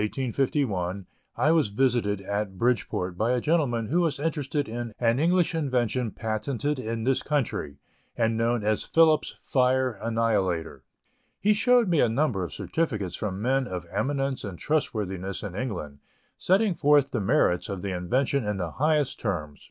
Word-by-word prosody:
Late 105 Hz, +4 st, -3 dB
in 130 Hz, -2 st, -1 dB
August, -, -, -10 dB
1851, 100 Hz, -, 0 dB, 0.3 s
I 155 Hz, -, +3 dB
was 160 Hz, -6 st, +3 dB
visited 105 Hz, -2 st, +1 dB
at 100 Hz, 0 st, -3 dB
Bridgeport 95 Hz, -6 st, -1 dB
by 115 Hz, +3 st, +2 dB
a 125 Hz, -, +1 dB
gentleman 130 Hz, -6 st, +1 dB
who 170 Hz, +5 st, +2 dB
was 160 Hz, -5 st, 0 dB
interested 145 Hz, -2 st, -1 dB
in 120 Hz, 0 st, -5 dB
an 115 Hz, +1 st, +2 dB
English 175 Hz, +2 st, +2 dB
invention 125 Hz, -6 st, 0 dB
patented 125 Hz, +7 st, -2 dB
in 115 Hz, -1 st, -3 dB
this 135 Hz, +2 st, +1 dB
country, 120 Hz, -, -2 dB, 0.4 s
and 115 Hz, -1 st, +1 dB
known 115 Hz, 0 st, +1 dB
as 105 Hz, 0 st, +1 dB
Phillips' 160 Hz, -2 st, +3 dB
Fire 130 Hz, 0 st, +2 dB
Annihilator. 105 Hz, -8 st, 0 dB, 0.6 s
He 210 Hz, +1 st, +3 dB
showed 245 Hz, +1 st, +4 dB
me 170 Hz, -4 st, +2 dB
a 120 Hz, -, +4 dB
number 115 Hz, -5 st, 0 dB
of 85 Hz, -, -5 dB
certificates 110 Hz, -, -2 dB
from 100 Hz, -1 st, -4 dB
men 130 Hz, +1 st, +1 dB
of 90 Hz, -4 st, -5 dB
eminence 135 Hz, -1 st, -1 dB
and 95 Hz, -4 st, -6 dB
trustworthiness 100 Hz, -, -2 dB
in 100 Hz, -4 st, -5 dB
England, 90 Hz, -, -5 dB, 0.4 s
setting 195 Hz, +2 st, +2 dB
forth 145 Hz, -3 st, +3 dB
the 120 Hz, -, -1 dB
merits 100 Hz, -5 st, +2 dB
of 100 Hz, -2 st, -5 dB
the 100 Hz, -, -2 dB
invention 130 Hz, +9 st, 0 dB
in 105 Hz, -1 st, -2 dB
the 90 Hz, -4 st, -3 dB
highest 150 Hz, -2 st, +1 dB
terms. 75 Hz, -9 st, -3 dB
120 Hz, 170 wpm, -26 LUFS, 100-145 Hz, 0.6 s, showed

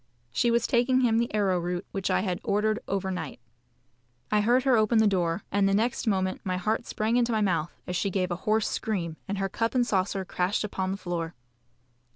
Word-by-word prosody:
She 235 Hz, -, +2 dB
was 235 Hz, 0 st, +2 dB
taking 255 Hz, +1 st, +3 dB
him 230 Hz, -2 st, +3 dB
the 235 Hz, -, -1 dB
arrowroot 180 Hz, -3 st, 0 dB
which 195 Hz, -1 st, -2 dB
I -, -, +2 dB
had 185 Hz, -3 st, -2 dB
ordered 215 Hz, 0 st, +1 dB
over 195 Hz, -1 st, -1 dB
night. 165 Hz, -9 st, -5 dB, 0.9 s
I 210 Hz, 0 st, +4 dB
heard 245 Hz, +4 st, +3 dB
her 265 Hz, -2 st, +4 dB
open 220 Hz, +1 st, +3 dB
the 220 Hz, -, +5 dB
door, 180 Hz, -2 st, +1 dB
and 200 Hz, -1 st, +3 dB
the 195 Hz, -, +2 dB
next 235 Hz, +3 st, 0 dB
moment 190 Hz, -2 st, 0 dB
my 185 Hz, -1 st, -1 dB
heart 220 Hz, +5 st, -1 dB
sprang 220 Hz, +3 st, 0 dB
into 240 Hz, -1 st, +2 dB
my 220 Hz, -1 st, +1 dB
mouth 175 Hz, -5 st, 0 dB
as 180 Hz, -, -4 dB
she 195 Hz, -, 0 dB
gave 185 Hz, -1 st, -1 dB
a -, -, 0 dB
hoarse 215 Hz, 0 st, +3 dB
scream, 170 Hz, -7 st, -2 dB
and 200 Hz, +1 st, -2 dB
her 195 Hz, 0 st, 0 dB
cup 225 Hz, +5 st, -2 dB
and 245 Hz, -1 st, +3 dB
saucer 195 Hz, -2 st, 0 dB
crashed 180 Hz, +4 st, -1 dB
upon 190 Hz, -2 st, -2 dB
the 195 Hz, -, -2 dB
floor. 175 Hz, -3 st, -4 dB
200 Hz, 210 wpm, -27 LUFS, 185-225 Hz, 0.9 s, the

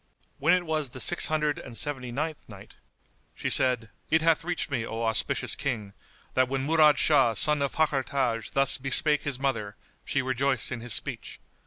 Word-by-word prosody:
When 170 Hz, +6 st, +4 dB
it 180 Hz, -1 st, -2 dB
was 155 Hz, -4 st, -2 dB
the 130 Hz, -, -10 dB
Six 175 Hz, -, +4 dB
Hundred 150 Hz, -1 st, -1 dB
and 115 Hz, -, -9 dB
Seventy 130 Hz, -4 st, -3 dB
ninth 155 Hz, +3 st, -5 dB
Night, 100 Hz, -2 st, -13 dB, 0.6 s
She -, -, -3 dB
said, 125 Hz, -4 st, +4 dB, 0.2 s
It 160 Hz, 0 st, +2 dB
hath 165 Hz, 0 st, +2 dB
reached 175 Hz, -3 st, -3 dB
me, 125 Hz, -4 st, -1 dB
O 115 Hz, 0 st, -5 dB
auspicious 110 Hz, -1 st, +1 dB
King, 110 Hz, -8 st, -4 dB, 0.4 s
that 130 Hz, -1 st, +2 dB
when 135 Hz, 0 st, -2 dB
Murad 155 Hz, -2 st, +4 dB
Shah 135 Hz, -7 st, +3 dB
son 150 Hz, +8 st, +2 dB
of 140 Hz, -, -1 dB
Fakhr 150 Hz, -3 st, +1 dB
Taj 120 Hz, -5 st, -2 dB
thus 135 Hz, 0 st, +1 dB
bespake 145 Hz, +3 st, +2 dB
his 145 Hz, -4 st, -2 dB
mother, 115 Hz, -7 st, -3 dB, 0.3 s
she 140 Hz, -, -1 dB
rejoiced 130 Hz, 0 st, 0 dB
in 125 Hz, -2 st, -5 dB
his 120 Hz, -1 st, -3 dB
speech. -, -, -5 dB
135 Hz, 185 wpm, -27 LUFS, 120-150 Hz, 0.6 s, When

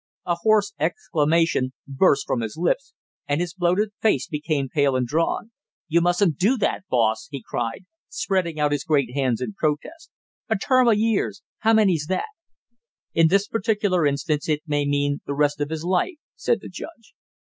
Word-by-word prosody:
A 175 Hz, -, +1 dB
hoarse 215 Hz, -1 st, +3 dB
exclamation 155 Hz, -3 st, +1 dB
burst 140 Hz, 0 st, +2 dB
from 120 Hz, -, -1 dB
his 110 Hz, +2 st, -5 dB
lips, 180 Hz, +11 st, -1 dB, 0.3 s
and 145 Hz, +1 st, 0 dB
his 175 Hz, -1 st, -2 dB
bloated 185 Hz, +3 st, +1 dB
face 210 Hz, -, +2 dB
became 150 Hz, -2 st, -2 dB
pale 140 Hz, 0 st, +1 dB
and 130 Hz, -1 st, +1 dB
drawn. 165 Hz, -, -1 dB, 0.4 s
"You 170 Hz, +1 st, +3 dB
mustn't 175 Hz, -2 st, +2 dB
do 230 Hz, +8 st, +3 dB
that, 195 Hz, -, -1 dB
boss!" 115 Hz, -3 st, +1 dB
he 140 Hz, -5 st, -7 dB
cried, 120 Hz, +9 st, -3 dB, 0.2 s
spreading 180 Hz, -5 st, -1 dB
out 150 Hz, -1 st, +2 dB
his 145 Hz, -1 st, -1 dB
great 140 Hz, -6 st, +1 dB
hands 130 Hz, -4 st, 0 dB
in 210 Hz, -, -3 dB
protest. 180 Hz, -, -3 dB, 0.4 s
"A 220 Hz, -, +2 dB
term 255 Hz, +4 st, +3 dB
of 225 Hz, -3 st, +5 dB
years 220 Hz, -1 st, 0 dB, 0.2 s
how 225 Hz, +1 st, +3 dB
many's 185 Hz, -9 st, +3 dB
that?" 190 Hz, -, -1 dB, 0.9 s
"In 165 Hz, 0 st, +5 dB
this 195 Hz, +4 st, +2 dB
particular 205 Hz, -7 st, +1 dB
instance 150 Hz, +2 st, -1 dB
it 150 Hz, -1 st, 0 dB
may 145 Hz, -2 st, 0 dB
mean 145 Hz, 0 st, 0 dB
the 140 Hz, -, -2 dB
rest 145 Hz, 0 st, +1 dB
of 145 Hz, -, -1 dB
his 160 Hz, 0 st, -4 dB
life," 185 Hz, -, +1 dB, 0.2 s
said 475 Hz, -, 0 dB
the -, -, -9 dB
judge. 240 Hz, -10 st, -10 dB
160 Hz, 175 wpm, -23 LUFS, 145-200 Hz, 0.9 s, of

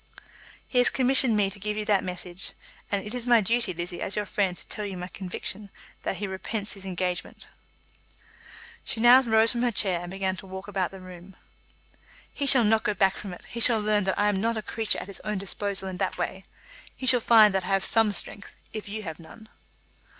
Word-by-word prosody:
"He 250 Hz, -, +1 dB
has 245 Hz, -, +6 dB
commissioned 260 Hz, -3 st, +4 dB
me 200 Hz, -2 st, +1 dB
to 200 Hz, -, -8 dB
give 210 Hz, +1 st, -3 dB
you 215 Hz, -, -3 dB
that 205 Hz, -2 st, +2 dB
message; 180 Hz, 0 st, -4 dB, 0.4 s
and 200 Hz, -1 st, -1 dB
it 210 Hz, -, -6 dB
is 245 Hz, -1 st, -4 dB
my 240 Hz, -1 st, +6 dB
duty, 230 Hz, +1 st, 0 dB
Lizzie, 175 Hz, +1 st, -6 dB
as 195 Hz, -, -3 dB
your 210 Hz, -, -1 dB
friend, 190 Hz, -3 st, -1 dB
to -, -, -10 dB
tell 210 Hz, -, -6 dB
you 195 Hz, -2 st, -5 dB
my 180 Hz, 0 st, -5 dB
conviction 190 Hz, +2 st, -7 dB, 0.3 s
that -, -, -3 dB
he 205 Hz, -, -4 dB
repents 200 Hz, +2 st, -3 dB
his 195 Hz, -1 st, -11 dB
engagement." 180 Hz, -1 st, -4 dB, 1.4 s
She 225 Hz, -, -4 dB
now 240 Hz, +3 st, +7 dB
rose 225 Hz, -2 st, +3 dB
from 240 Hz, -, -2 dB
her 245 Hz, -, +2 dB
chair 190 Hz, -4 st, +2 dB
and 175 Hz, -, -7 dB
began 190 Hz, 0 st, -2 dB
to 190 Hz, -, -11 dB
walk 190 Hz, +1 st, -8 dB
about 190 Hz, -3 st, -1 dB
the 190 Hz, -1 st, -12 dB
room. 185 Hz, +1 st, -12 dB, 1.0 s
"He 280 Hz, -, -2 dB
shall 260 Hz, -3 st, +7 dB
not 220 Hz, +1 st, +3 dB
go 210 Hz, -, -1 dB
back 195 Hz, -1 st, +2 dB
from 200 Hz, -, -7 dB
it. 180 Hz, -, -11 dB
He 235 Hz, -, -7 dB
shall 230 Hz, -1 st, +5 dB
learn 210 Hz, -1 st, +1 dB
that 190 Hz, -, -1 dB
I 205 Hz, -, +2 dB
am 200 Hz, -2 st, 0 dB
not 230 Hz, +1 st, 0 dB
a 215 Hz, -, -4 dB
creature 225 Hz, -1 st, -1 dB
at -, -, -5 dB
his 200 Hz, -, -8 dB
own 210 Hz, -1 st, -2 dB
disposal 195 Hz, 0 st, -3 dB
in 185 Hz, -1 st, -5 dB
that 195 Hz, -, -2 dB
way. 190 Hz, 0 st, -4 dB, 0.5 s
He 260 Hz, -, -7 dB
shall 250 Hz, -1 st, +7 dB
find 220 Hz, -3 st, +6 dB
that 190 Hz, -2 st, -1 dB
I -, -, -7 dB
have 195 Hz, -1 st, +1 dB
some 225 Hz, -2 st, +3 dB
strength, 200 Hz, 0 st, -1 dB, 0.2 s
if 215 Hz, -2 st, -6 dB
you 215 Hz, +1 st, -5 dB
have 160 Hz, -3 st, -7 dB
none." 220 Hz, +7 st, -14 dB
205 Hz, 225 wpm, -26 LUFS, 190-220 Hz, 1.4 s, now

